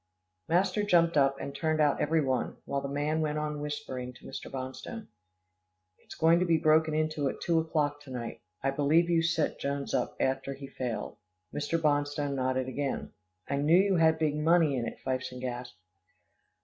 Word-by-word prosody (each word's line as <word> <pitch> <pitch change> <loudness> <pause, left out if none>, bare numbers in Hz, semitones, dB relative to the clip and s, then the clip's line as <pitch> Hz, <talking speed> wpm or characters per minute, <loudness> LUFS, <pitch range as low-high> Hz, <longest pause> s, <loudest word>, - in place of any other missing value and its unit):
Master 185 +4 +2
jumped 170 -5 +3
up, 135 -1 +4
and 140 - -5
turned 155 +1 0
out 150 -2 +3
every 160 +1 +2
one, 130 -2 -1
while 140 - -2
the 140 - -4
man 145 +3 0
went 150 -1 -1
on 150 -1 -3
whispering 145 -4 -5
to - - -17
Mr. - - -7
Bonstone. 135 - -6 0.9
"It's - - -12
going 165 +1 +4
to 180 - +2
be 165 -1 +4
broken 155 0 +3
into 155 -2 0
at - - -6
two 170 -1 +2
o'clock 150 -3 -1
to 145 - -14
night. 120 -2 -6 0.2
I 135 - +2
believe 155 +5 +3
you 165 -1 +4
set 165 -2 0
Jones 140 0 -3
up - - 0
after 135 +1 -1
he 140 +1 -9
failed." 120 -5 -4 0.4
Mr. 150 +3 -1
Bonstone 145 -2 0
nodded 130 -1 0
again. 140 +1 -3 0.3
"I 140 - -1
knew 150 +5 +4
you 195 -1 +3
had 160 -1 +4
big 155 -2 +1
money 160 -1 +3
in 120 -2 -2
it," - - -6
Fifeson 130 -1 -2
gasped. 125 -3 -5
145 Hz, 185 wpm, -30 LUFS, 135-160 Hz, 0.9 s, up